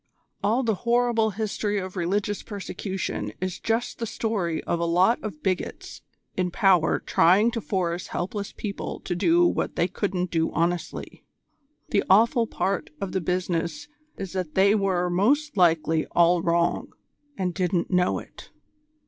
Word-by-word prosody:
All 235 +5 +2
the 225 -2 +1
horrible 235 -2 +2
history 210 0 -2
of 185 -1 -4
religious 195 +3 -1
persecution 190 - -4
is 185 -1 -3
just 230 +2 -1
the 230 - -2
story 200 -8 -2
of 170 - -1
a 170 - 0
lot 180 +8 +3
of 220 +8 -7
bigots 185 -1 -3 0.3
in 185 -1 0
power 180 -3 +3
trying 200 +7 +4
to 230 - -3
force 175 -3 -2
helpless 200 +3 -4
people 200 -2 -5
to 175 - -3
do 335 - +4
what - - 0
they - - +2
couldn't 185 -3 -2
do 165 -1 +1
honestly. 170 +1 -2 0.7
The 200 - +2
awful 230 +4 +5
part 195 -1 -2
of 195 - -4
the 190 +1 -1
business 180 - -2 0.3
is 195 -2 -6
that 180 -5 -4
they 195 +2 +5
were 190 -4 +1
most 280 +11 +2
likely 160 -3 +3
all 175 0 +5
wrong, 170 0 0 0.4
and 180 -2 -1
didn't 180 -1 0
know 180 -1 +2
it." - - -11
190 Hz, 150 wpm, -25 LUFS, 175-215 Hz, 0.7 s, awful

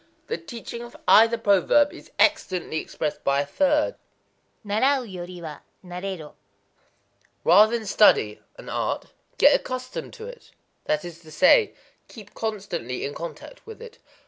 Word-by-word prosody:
The 465 - -3
teaching 235 -6 -8
of 240 0 -11
either 230 +2 +6
proverb 225 +8 +3
is - - -13
excellently 185 - +1
expressed 155 -1 -4
by 140 0 +2
a - - -3
third:—Narau 275 - -1
yori 180 -4 -8
wa 155 -2 -7 0.3
naréro: 180 -3 -6 1.1
"Rather 215 +7 +6
than 225 - -8
study 195 - +4 0.2
[an - - -12
art], - - -3 0.2
get - - +6
accustomed 255 0 -4
to 450 -2 -9
it,"—that 335 - -6
is 170 -1 -9
to 160 -2 -16
say, 280 - +4 0.3
"keep 210 -3 -13
constantly 200 - -4
in 145 - -5
contact 170 - -9
with 445 -1 -10
it." 470 0 -12
210 Hz, 135 wpm, -24 LUFS, 175-275 Hz, 1.1 s, either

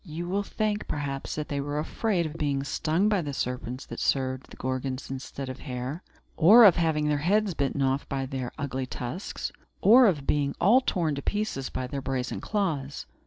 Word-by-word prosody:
You 170 -1 -6
will 195 +3 0
think, 210 +1 -2
perhaps, 140 -2 -3
that 150 -1 -3
they 140 -1 -2
were 145 +1 -3
afraid 175 +3 0
of 155 - -4
being 140 -3 -1
stung 160 +7 +1
by 205 -3 +2
the 145 -3 -4
serpents 125 0 -3
that - - -7
served 130 -1 0
the - - -12
Gorgons 130 +1 -3
instead 135 +1 -6
of 130 0 -6
hair 130 +4 -5 0.3
or 215 +9 +8
of 190 - +8
having 160 -3 +1
their 150 -1 +1
heads 200 +5 +2
bitten 140 -1 0
off 135 +1 0
by 135 -1 -2
their 130 -2 -4
ugly 130 -2 -3
tusks 125 - -5 0.3
or 240 +4 +7
of 150 -8 0
being 140 -1 +1 0.3
torn 170 -5 +1
all - - -2
to 140 - -4
pieces 205 -9 -2
by 130 - -3
their 135 +2 -4
brazen 130 -1 -3
claws. 155 -10 -2
145 Hz, 195 wpm, -27 LUFS, 135-175 Hz, 0.3 s, or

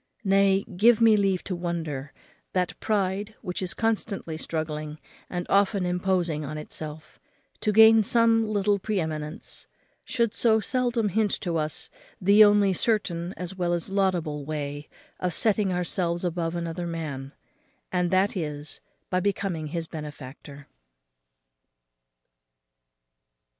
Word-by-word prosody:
Nay, 195 -1 +3
give 215 +5 +3
me 225 -2 +6
leave 195 -3 +1
to 185 - -3
wonder 160 -5 -4 0.4
that 180 -1 -1
pride, 205 0 -1
which 180 -2 -4
is 185 -1 -2
constantly 215 -6 -1
struggling, 155 -1 -4 0.3
and 175 -1 -3
often 200 -1 +2
imposing 180 -3 0
on 155 +2 -5
itself, 155 0 -7 0.4
to 215 - +1
gain 220 +1 +8
some 230 +1 +4
little 205 -1 +1
pre 210 0 -1
eminence, 155 -2 -4 0.4
should 235 -3 0
so 225 -1 +3
seldom 240 -1 0
hint 210 +2 +1
to 175 -2 -2
us 155 -1 -3 0.3
the 200 +3 +7
only 205 -2 +5
certain 180 -4 0
as 180 +1 -5
well 175 -2 0
as 175 +2 -2
laudable 175 -7 0
way 145 0 -5 0.3
of 180 -2 0
setting 210 -3 +2
ourselves 175 -1 0
above 170 -1 -2
another 170 0 -3
man, 145 -5 -5 0.6
and 180 -1 +1
that 190 +3 +2
is, 150 -4 -4 0.3
by 185 - +2
becoming 185 -4 -1
his 165 +2 -3
benefactor. 145 -2 -9
180 Hz, 125 wpm, -26 LUFS, 160-205 Hz, 0.6 s, gain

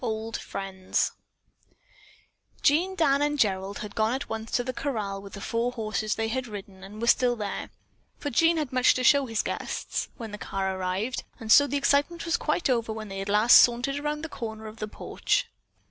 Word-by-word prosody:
OLD 220 -1 -3
FRIENDS 190 -1 -2 1.5
Jean, 350 +7 +3
Dan 285 -5 +3
and 295 0 +1
Gerald 195 -4 0
had 205 - -9
gone 220 +3 +1
at 270 - -5
once 225 0 -5
to 245 - 0
the 255 +1 -4
corral 215 -9 -3
with 200 -1 -11
the - - -7
four 235 +3 -1
horses 215 -2 -2
they 225 - -1
had 255 +2 -2
ridden 195 -3 -9
and 205 +2 -10
were 235 - -1
still 245 +1 +4
there 205 -3 -4 0.5
(for 290 - -4
Jean 330 +6 +4
had 295 -5 -2
much 255 0 +4
to 255 - -1
show 280 +1 +5
his 225 -2 -1
guests) - - -3
when 225 -4 -7
the 210 - -7
car 190 -1 -2
arrived, 190 +6 -2 0.2
and 220 -1 -3
so 285 +4 +8
the 285 - -1
excitement 285 +5 +1
was 335 - +1
quite - - 0
over 235 -4 +1
when 215 -1 -6
they 195 0 -5
at 195 - -5
last 210 +4 +7
sauntered 245 +3 +3
around 300 +1 -3
one - - -6
corner 220 -4 -6
of 215 +1 -9
the 215 - -4
porch. - - -1
225 Hz, 205 wpm, -27 LUFS, 210-275 Hz, 1.5 s, so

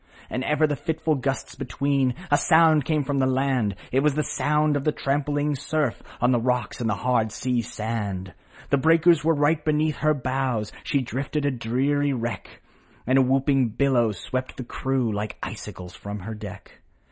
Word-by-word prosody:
And 130 - -2
ever 150 +2 +2
the 150 -1 0
fitful 160 +1 -1
gusts 135 -1 -2
between 135 -1 0 0.2
A - - +6
sound 160 -3 +5
came 155 -2 +1
from 140 0 -1
the 130 - +3
land; 130 -6 +1 0.2
It 130 - +3
was 145 0 +2
the 150 - +1
sound 150 0 +1
of 140 - -1
the 150 - +2
trampling 145 +1 0
surf, 145 -1 -1 0.2
On 125 +1 +3
the 120 - +3
rocks 125 +1 -1
and 115 - 0
the 105 - +1
hard 110 0 +1
sea 125 +1 -1
sand. 105 -5 -4 0.4
The 140 - +4
breakers 165 +1 +4
were 165 +1 +3
right 150 +1 +2
beneath 155 0 +1
her 155 0 +2
bows, 130 -5 -1
She 140 - +1
drifted 135 +4 -3
a 145 - +2
dreary 135 +4 0
wreck, 120 -2 -5 0.4
And 130 +2 +4
a - - +6
whooping 135 -2 +2
billow 125 -5 +3
swept 130 +6 -5
the 130 - -4
crew 130 -1 -1
Like 105 +1 -4
icicles 90 0 -7
from 100 0 -7
her 110 +5 -6
deck. 105 - -10
135 Hz, 180 wpm, -25 LUFS, 120-150 Hz, 0.4 s, A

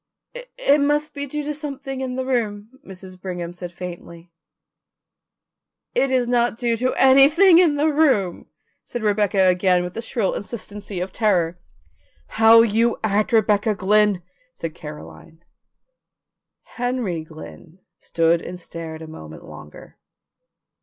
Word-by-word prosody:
"It - - 0
must 295 +1 0
be 285 0 -5
due 300 +2 -4
to 300 +1 -3
something 275 -2 -6
in 255 -1 -4
the 260 0 -3
room," 220 -4 -2
Mrs. 185 -1 -11
Brigham 175 -2 -5
said 175 0 -8
faintly. 175 -1 -10 1.6
"It 275 - +1
is 255 -2 +1
not 240 -1 +1
due 235 -1 0
to 255 +3 -1
anything 295 +7 +6
in 335 -5 +4
the 290 +1 +1
room," 275 - +1 0.4
said 240 -2 -6
Rebecca 205 -2 +2
again 180 0 +3
with 180 0 -6
the 230 - -5
shrill 230 -4 -1
insistency 205 -2 -7
of 185 - -4
terror. 180 -6 0 0.8
"How 225 +1 +8
you 230 +1 +1
act, 210 +1 0
Rebecca 215 -1 +2
Glynn," 205 -1 +2 0.3
said 165 -1 -6
Caroline. 155 +1 -12 1.3
Henry 240 -9 -2
Glynn 80 - -13 0.2
stood 165 0 +1
and 180 0 -8
stared 165 -2 -8
a - - -9
moment 80 - -11
longer. 75 - -13
210 Hz, 135 wpm, -21 LUFS, 180-260 Hz, 1.6 s, How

